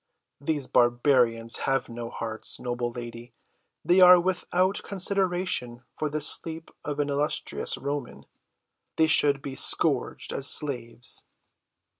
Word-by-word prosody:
These 145 -1 -3
barbarians 120 -2 +1
have 135 -2 -1
no 115 0 -8
hearts, 110 -2 -4
noble 120 -1 -4
lady, 120 0 -10 0.5
they 175 +3 +3
are 180 0 +8
without 185 +1 -1
consideration 180 -11 -1
for 155 - -3
the 155 +1 -4
sleep 160 +2 +2
of 145 0 -5
an 145 0 -1
illustrious 145 +2 0
Roman. 140 -2 -6 0.7
They 160 - +3
should 145 -3 +3
be 140 - -6
scourged - - 0
as 135 - +1
slaves." 120 -5 +1
140 Hz, 120 wpm, -25 LUFS, 120-160 Hz, 0.7 s, are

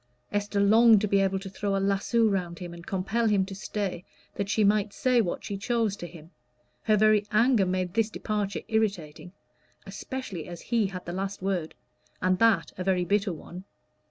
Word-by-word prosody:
Esther 205 0 -1
longed 220 +2 +6
to 210 - 0
be 200 0 +2
able 195 0 +1
to 195 +1 -7
throw 200 +1 -2
a - - +1
lasso 200 +4 +1
round 180 -4 -2
him 175 0 -7
and 170 0 -12
compel 200 +5 0
him 200 -3 +2
to 195 - -8
stay, 195 -2 -4 0.3
that 200 -1 -3
she 215 - +2
might 205 0 +2
say 255 -3 +2
what 180 -5 -3
she 200 - -4
chose 220 0 0
to 175 - -7
him; 165 0 -14 0.5
her 215 -1 +4
very 215 0 +4
anger 220 -2 +3
made 185 -1 -1
this 225 0 +1
departure 210 -2 -3
irritating, 195 -8 -2 0.5
especially 195 -2 -6
as 175 -1 -8
he 230 -4 0
had 180 -2 -8
the 175 - -5
last 195 +1 -4
word, 185 -5 -2 0.4
and 185 0 +1
that 230 0 +3
a - - -1
very 180 -1 +1
bitter 200 +1 +1
one. 175 +2 -9
200 Hz, 190 wpm, -27 LUFS, 185-215 Hz, 0.5 s, longed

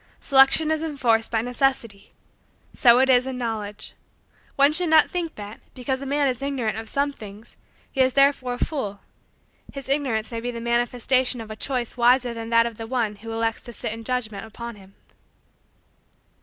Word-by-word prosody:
Selection 275 +3 +5
is 315 0 0
enforced 250 -8 +1
by 225 -1 0
necessity. 245 -4 -1 0.6
So 235 -1 +6
it 265 +1 +4
is 255 -1 +4
in 260 -1 -4
Knowledge. 220 -4 -5 0.6
One 280 +2 +4
should 350 +1 +1
not 315 -1 +5
think 345 -3 -3
that, 205 +1 -9 0.2
because 260 +1 -3
a 275 - -5
man 285 +1 +1
is 255 -1 -2
ignorant 265 -6 -2
of 225 0 -6
some 285 0 0
things, 210 -1 -12 0.4
he 270 - 0
is 260 0 +3
therefore 275 -2 +3
a - - 0
fool; 210 -10 -5 0.7
his 275 -2 -8
ignorance 255 -6 0
may 230 - -3
be 245 - -3
the 235 -1 -5
manifestation 240 +2 0
of 220 -1 -8
a - - -6
choice 245 +1 -3
wiser 245 0 +3
than 230 0 -6
that 230 0 +4
of 230 -2 -5
the 225 - -6
one 225 -4 -1
who 225 +2 -9
elects 225 0 -1
to 240 - -9
sit 215 - -3
in 225 0 -8
judgment 225 -5 -3
upon 235 +1 -8
him. 195 -1 -17
245 Hz, 185 wpm, -24 LUFS, 225-270 Hz, 0.7 s, So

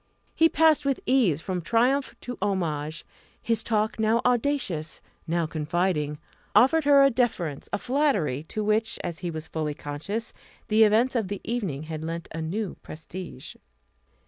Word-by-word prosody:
He 325 0 +4
passed 320 -1 +4
with 275 -1 0
ease 225 - +3
from 185 -1 -3
triumph 250 - +1
to 245 - -5
homage; 160 -6 -2 0.3
his 230 -2 0
talk 220 0 0
now 220 +1 +3
audacious, 240 - 0 0.3
now 170 0 +1
confiding, 155 -1 -1 0.4
offered 305 +5 +5
her 280 -1 +7
a 275 - +5
deference, 195 - -1
a - - 0
flattery, 245 - +1
to 215 +5 -3
which, 215 +1 +1
as 170 -2 -4
he 175 - -3
was 160 -1 -5
fully 155 -2 -3
conscious, 200 +13 -5 0.4
the 220 +1 +6
events 225 +5 +3
of 225 -5 +1
the 200 0 -4
evening 195 - -3
had 155 0 -6
lent 165 +1 -4
a 165 - -4
new 185 +4 -3
prestige. 160 -2 -9
200 Hz, 155 wpm, -26 LUFS, 160-240 Hz, 0.4 s, her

